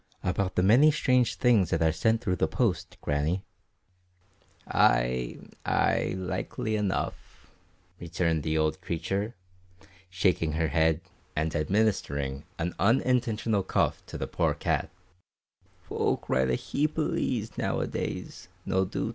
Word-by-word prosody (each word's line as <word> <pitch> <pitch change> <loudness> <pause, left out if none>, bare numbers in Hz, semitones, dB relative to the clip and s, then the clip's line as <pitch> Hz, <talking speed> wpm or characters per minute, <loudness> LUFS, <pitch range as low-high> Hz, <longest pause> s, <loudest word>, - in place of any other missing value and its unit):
"About 95 +1 -1
the 90 - +2
many 120 +10 +6
strange 125 -4 +2
things 115 -9 +3
that 80 - +1
are 80 - +4
sent 110 +8 +1
through 90 -5 -1
the - - +2
post, 90 -7 -1
Grannie." 75 +6 0 1.2
"Ay, 60 0 +2 0.3
ay, - - +1
likely 95 +3 -3
enough," 105 -3 -3 0.5
returned 85 -1 0
the 80 +1 -1
old 80 +4 0
creature, 95 +7 -2 0.7
shaking 90 -3 +1
her 80 0 0
head 80 +1 +2 0.3
and 80 +1 -1
administering 75 -7 0
an 85 +1 -2
unintentional 115 -2 +2
cuff 95 - 0
to - - -6
the - - -2
poor - - 0
cat; - - -1 1.0
"folk - - -1
write 65 0 +2
a 60 - +2
heap 150 - -1
o' 160 - +2
lees 115 -6 -1
noo - - -1
a - - 0
days, - - -5 0.2
nae 95 0 +2
doot." 95 +3 -3
90 Hz, 135 wpm, -28 LUFS, 80-110 Hz, 1.2 s, many